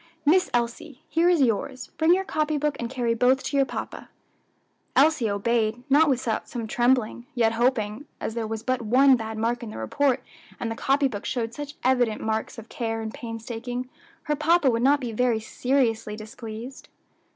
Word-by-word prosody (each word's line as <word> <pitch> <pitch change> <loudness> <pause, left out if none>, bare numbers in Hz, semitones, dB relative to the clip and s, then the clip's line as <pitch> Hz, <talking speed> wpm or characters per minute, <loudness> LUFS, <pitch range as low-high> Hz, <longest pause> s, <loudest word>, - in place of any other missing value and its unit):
Miss 360 +5 +4
Elsie, 240 +4 -3
here 335 +2 +3
is 340 -6 +4
yours; 255 +2 -1
bring 320 +1 +4
your 385 - -1
copy 305 -4 -1
book, 295 0 0
and 235 - -3
carry 240 -3 0
both 250 +3 +3
to - - -3
your 275 -1 +3
papa." - - -6 0.9
Elsie 280 -5 +4
obeyed, 220 +3 0
not 300 +2 +6
without 245 -4 -1
some 235 -3 -4
trembling, 240 +1 +1
yet 230 -2 +3
hoping, 230 +1 0
as - - -3
there 230 -1 -3
was 220 0 -4
but 255 0 0
one 260 +4 +5
bad 220 -2 -5
mark 235 +2 0
in 230 - -6
the - - -8
report 255 - 0 0.4
and 230 - -3
the - - -3
copy 275 +3 +2
book 205 -6 -6
showed 230 -2 -2
such 290 +2 -7
evident 245 -4 +2
marks 220 +2 -2
of 225 0 -9
care 225 -1 -3
and 220 -1 -5
painstaking, 240 +2 -5 0.3
her 300 -2 0
papa 305 -2 +3
would 230 0 0
not 280 +3 +4
be 245 -4 -4
very 235 0 +1
seriously 225 -2 0
displeased. 220 +3 -9
245 Hz, 185 wpm, -25 LUFS, 225-275 Hz, 0.9 s, not